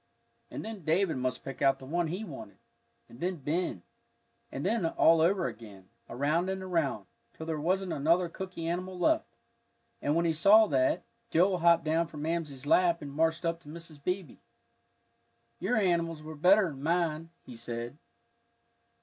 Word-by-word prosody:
And - - -6
then 220 -5 -7
David 165 +1 +1
must 130 0 -2
pick 135 - -8
out 135 -1 +4
the 135 - -12
one 170 +4 -1
he 180 +7 -4
wanted, 125 - -9 0.5
and 120 - -15
then 180 +3 -1
Ben. 150 - -2 0.7
And 135 - -5
then 220 +1 +1
all 165 0 +4
over 180 +2 +2
again, 100 -4 -8 0.2
around 155 +8 0
and 190 0 -3
around, 165 - -1 0.3
till 160 - -8
there 160 -2 -3
wasn't 185 +3 0
another 170 +5 +2
cooky 180 -1 -7
animal 180 +2 -3
left. 320 - +2 0.7
And 145 - +1
when 170 +1 +2
he 165 - +2
saw 200 +7 +6
that, 130 +5 +2 0.3
Joel 180 +2 +3
hopped 170 0 +4
down 160 +2 +1
from 150 -2 -8
Mamsie's 155 -5 -3
lap 170 +1 +3
and 140 -1 -7
marched 165 +3 +1
up 165 0 -1
to 155 - -21
Mrs. 160 -2 -11
Beebe. 180 -4 -3 1.2
"Your 205 +8 0
animals 170 -5 0
were 155 +1 -7
better'n 180 -2 +3
mine," 165 0 0 0.2
he 125 - -10
said. 120 +4 -6
165 Hz, 165 wpm, -30 LUFS, 145-180 Hz, 1.2 s, saw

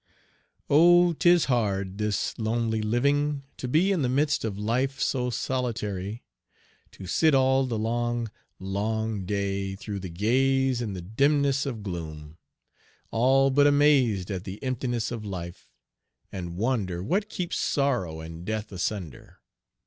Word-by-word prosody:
Oh! 175 +3 +6
'tis 175 +1 +4
hard, 100 -6 -1
this 105 -1 -1
lonely 110 0 0
living, 140 +6 +1
to 125 - -4
be 165 +10 +3
In 185 -5 +1
the 125 - +1
midst 145 +3 +1
of 105 -3 -3
life 125 +6 -1
so 125 -2 0
solitary, 115 -5 -3 0.7
To 95 - -10
sit 155 - +3
all 130 0 +3
the 115 -3 -2
long, 120 +1 -1 0.3
long 105 +1 -2
day 100 -1 -2
through 100 +1 -6
and 85 -3 -8
gaze 130 +4 +2
In 110 -4 -3
the 90 -2 -6
dimness 140 +6 +2
of 115 -6 -5
gloom, 80 -4 -7 0.7
all 135 +4 +3
but 145 +2 +5
amazed 135 -10 +3
At 95 -2 -3
the 95 0 -7
emptiness 120 -3 -2
of 115 -3 -5
life, 90 -4 -7 0.6
and 85 -2 -6
wonder 100 -6 -1
What 200 - 0
keeps 180 -4 -3
sorrow 120 - 0
and 80 +1 -9
death 110 +2 -4
asunder. 90 - -5
115 Hz, 140 wpm, -26 LUFS, 100-135 Hz, 0.7 s, Oh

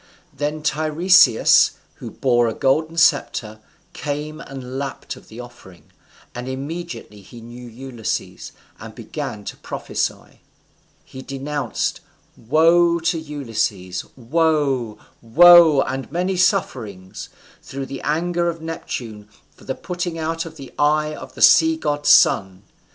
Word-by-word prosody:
Then 150 +1 -3
Tiresias, 155 - +4 0.2
who - - -8
bore 120 -3 +1
a 110 - -3
golden 155 +5 0
sceptre, 115 -9 +1 0.3
came 150 +1 -5
and 130 -2 -7
lapped 140 -1 -6
of - - -17
the 110 - -12
offering, 110 -7 -14 0.4
and 125 +1 -6
immediately 140 -5 -7
he 115 +5 -13
knew 120 +2 -11
Ulysses, 120 -1 -6 0.3
and - - -10
began 105 -1 -6
to - - -7
prophesy: - - -5 0.7
_he 130 0 -10
denounced 140 -2 -3 0.4
woe 165 +7 +3
to 165 0 0
Ulysses 115 - -3
woe, 135 -4 0 0.2
woe, 165 +4 +7
and 135 0 -5
many 180 +3 -1
sufferings 115 - -2 0.3
through 135 0 -7
the 135 0 -7
anger 170 +3 0
of 165 -1 -5
Neptune 115 -10 -7 0.3
for - - -18
the - - -3
putting 175 -2 -5
out 165 +1 -3
of 160 - -12
the 135 -3 -11
eye 150 +1 +2
of - - -10
the - - 0
sea 160 -3 +6
god's 145 -2 -1
son. 95 0 +4
145 Hz, 130 wpm, -21 LUFS, 120-165 Hz, 0.7 s, woe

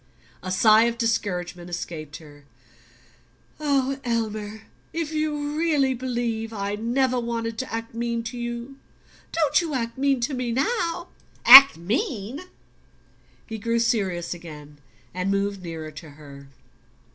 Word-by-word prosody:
A 185 - -6
sigh 215 +4 +5
of 235 0 -1
discouragement 180 -6 -2
escaped 155 -4 -6
her. 145 -2 -16 1.1
"Elmer 235 -7 -2 0.3
if 325 -2 -3
you 300 -1 -2
really 300 -5 +2
believe 235 -3 -3
I 200 -2 -3
never 245 +4 0
wanted 230 -1 -3
to 260 - -5
act 230 0 -5
mean 235 0 -2
to 240 +2 -6
you, 240 +2 -6 0.5
don't 310 -2 +2
you 320 -4 -3
act 235 0 -3
mean 275 -1 +2
to 260 +4 -1
me 250 -2 -2
now!" 345 - -1 0.4
"Act 270 -4 +11
mean?" 225 - -3 1.1
He 220 - -7
grew 230 +2 -1
serious 195 -8 0
again 150 -4 -12 0.3
and 185 +2 -2
moved 200 0 -1
nearer 165 -3 -7
to 155 +1 -11
her. 140 -1 -13
230 Hz, 130 wpm, -24 LUFS, 185-265 Hz, 1.1 s, Act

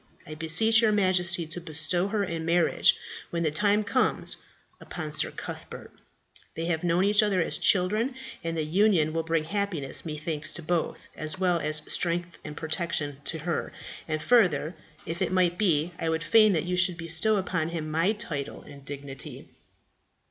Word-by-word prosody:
I 155 - -8
beseech 170 +9 +4
your 220 -2 +3
Majesty 185 -4 +2
to 160 +3 -4
bestow 175 +3 0
her 205 0 -1
in 170 -3 -4
marriage, 170 +1 +3 0.3
when 170 0 -2
the 155 - +1
time 205 +6 +2
comes, - - +1 0.4
upon 155 -4 -6
Sir 155 - 0
Cuthbert. - - -9 0.6
They 165 - -3
have 170 -1 -1
known 175 +1 +2
each 205 +2 +4
other 205 -3 +1
as 165 - +1
children, 215 +7 +3 0.3
and 165 0 -3
the 160 - 0
union 165 -1 +2
will 165 - 0
bring 165 -1 0
happiness, 180 -5 -3
methinks, 155 -1 -3
to 170 - -7
both, 170 +1 -2
as 155 +4 -2
well 180 -2 +1
as 155 0 +3
strength 175 0 -2
and 150 -1 -8
protection 160 -3 -2
to 165 - -1
her; 165 +1 -3 0.3
and 155 -1 -2
further, 180 - +3 0.3
if 165 +1 -5
it - - 0
might 180 -1 +1
be, 170 -5 +2
I 165 - -1
would 160 0 -1
fain 215 +5 +5
that 160 -2 0
you 180 0 -2
should 185 -2 +4
bestow 165 +6 +1
upon 180 -4 -1
him 160 -2 -4
my 165 +7 +2
title 160 -11 -4
and 140 -1 -13
dignity." 140 -1 -8
170 Hz, 175 wpm, -27 LUFS, 155-185 Hz, 0.6 s, fain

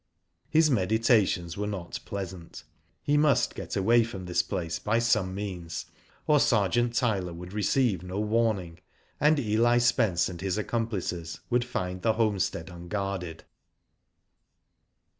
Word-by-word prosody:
His 155 -1 +4
meditations 105 -5 +2
were 105 +1 -2
not 95 -5 -5
pleasant. 95 -3 -7 0.4
He 145 +1 +2
must 145 -2 +3
get - - -6
away 115 +4 +4
from 100 -5 -7
this 90 0 +1
place 80 -3 -3
by 115 +2 0
some 110 -5 +1
means, 90 -5 -5 0.4
or 150 -1 +4
Sergeant 120 -1 +2
Tyler 100 -8 0
would, 90 +2 -9
receive 105 -2 +1
no 90 +2 -5
warnings 105 -6 0 0.4
and 150 +2 +4
Eli 120 -1 +2
Spence 110 -7 +2
and 85 -2 -7
his 95 -1 -1
accomplices 100 -7 -3
would 120 0 +3
find 90 -7 -4
the 110 +2 +2
homestead 100 -7 -1
unguarded. 90 -1 -4
100 Hz, 130 wpm, -28 LUFS, 90-115 Hz, 0.4 s, His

